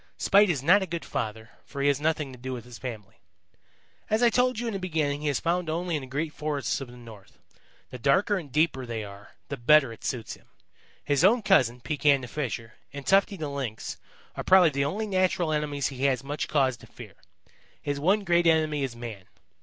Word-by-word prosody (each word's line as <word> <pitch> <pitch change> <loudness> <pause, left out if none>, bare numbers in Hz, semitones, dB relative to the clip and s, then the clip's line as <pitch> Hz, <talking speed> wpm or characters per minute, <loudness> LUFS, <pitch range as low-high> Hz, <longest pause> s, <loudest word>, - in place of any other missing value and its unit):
Spite 205 0 +4
is 140 -6 -1
not 185 +7 +5
a 190 - -3
good 170 -2 -5
father, 110 +1 -4
for 140 - -9
he - - +3
has 140 0 +2
nothing 155 -3 0
to 125 - -13
do 130 +1 -5
with 120 -2 -7
his 120 -2 -11
family. 110 -6 -8 0.9
"As 220 +3 +2
I 235 - +5
told 250 0 +2
you 240 - -3
in 230 - -2
the 195 - -3
beginning 155 -5 -1
he 150 - -2
is 140 - 0
found 175 0 -1
only 170 +1 -1
in 150 - -2
the 130 - -9
great 150 +4 -3
forests 150 -2 -2
of 135 - -6
the 120 0 -13
North. 115 -5 -14 0.5
The 125 - -8
darker 185 - +2
and 160 -8 -6
deeper 150 -3 +1
they 115 -2 -4
are, 100 0 -12
the - - -4
better 135 0 +4
it - - -16
suits 120 -3 -3
him. - - -16 0.6
His 145 0 +1
own 225 +4 +5
cousin, 125 - +3
Pekan 140 +1 +2
the 125 - -7
Fisher, 120 -4 -4 0.2
and 140 -1 -8
Tufty 195 +1 +3
the 155 -3 -4
Lynx, 135 -6 -5 0.4
are - - -4
probably 185 -4 +6
the 140 0 0
only 205 +10 -2
natural 185 -4 +1
enemies 145 -2 -1
he 135 0 -3
has 130 -3 +1
much 145 +2 -3
cause 135 -4 +1
to - - -16
fear. - - -12 0.7
His 145 -1 -3
one 195 +7 +2
great 175 -2 +3
enemy 155 -2 +2
is 130 -3 -3
man. 115 -5 -8
145 Hz, 220 wpm, -27 LUFS, 125-175 Hz, 0.9 s, probably